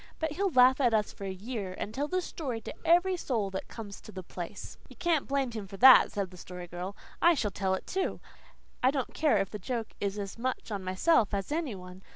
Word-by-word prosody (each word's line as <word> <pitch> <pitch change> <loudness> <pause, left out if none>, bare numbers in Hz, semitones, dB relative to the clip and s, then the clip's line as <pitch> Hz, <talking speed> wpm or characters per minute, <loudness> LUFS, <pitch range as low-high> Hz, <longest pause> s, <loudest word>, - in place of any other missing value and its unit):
"But 320 -1 -2
he'll 390 +6 0
laugh 260 -2 +5
at 240 -4 +4
us 210 -1 0
for 200 - -8
a - - -3
year, 195 -1 -5
and 215 - -4
tell 285 +5 -1
the 370 +2 -1
story 260 -11 -4
to - - -7
every 355 +2 +4
soul 225 - -1
that 190 - -5
comes 205 -4 -8
to - - -11
the 185 0 -7
place." 175 +3 -7
"You - - -13
can't 335 -5 +1
blame 275 -2 0
him 215 -4 -6
for 195 0 -9
that," 260 +4 +9
said 195 -3 -3
the 180 - -12
Story 180 0 -8
Girl. 180 +3 -6 0.3
"I 345 0 +6
shall 210 -7 -1
tell 190 0 0
it, - - -7
too. 380 0 -2 0.6
I 255 - +5
don't 270 -2 -2
care 310 -2 +3
if 195 - -1
the 210 - -5
joke 230 +2 -4
is 200 0 -2
as 200 +2 -5
much 255 -1 -3
on 200 -2 -3
myself 200 - +2
as 195 +6 -3
any 305 -8 -1
one. 180 0 -11
220 Hz, 240 wpm, -30 LUFS, 195-275 Hz, 0.6 s, that